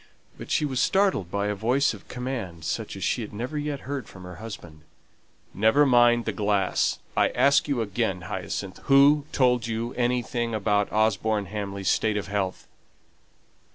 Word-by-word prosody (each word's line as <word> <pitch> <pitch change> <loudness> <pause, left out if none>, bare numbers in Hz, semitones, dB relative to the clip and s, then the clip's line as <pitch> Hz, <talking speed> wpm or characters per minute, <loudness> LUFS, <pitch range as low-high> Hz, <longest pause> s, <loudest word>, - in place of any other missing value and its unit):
But - - -10
she 150 - +1
was 130 -3 -2
startled 190 - +2
by 100 +2 -1
a 105 - 0
voice 120 +8 +1
of 100 - -13
command, 120 -11 -5
such - - -3
as - - -6
she - - 0
had - - -6
never 125 +8 -5
yet 145 -1 -3
heard 140 -1 -5
from 95 - -12
her 90 -1 -9
husband. 85 -8 -9 0.7
"Never 110 +8 +4
mind 120 -2 +4
the - - 0
glass. 100 -3 0 0.2
I - - +3
ask 140 +1 +3
you 140 -5 0
again, 100 -3 -1
Hyacinth, 95 0 -5
who 140 +2 +5
told 125 -4 +2
you 115 +1 -3
anything 120 -1 -1
about 105 -1 +1
Osborne 110 -1 +1
Hamley's 100 -1 -5
state 110 -1 +1
of 100 - -4
health?" 100 -2 -3
110 Hz, 165 wpm, -25 LUFS, 100-125 Hz, 0.7 s, who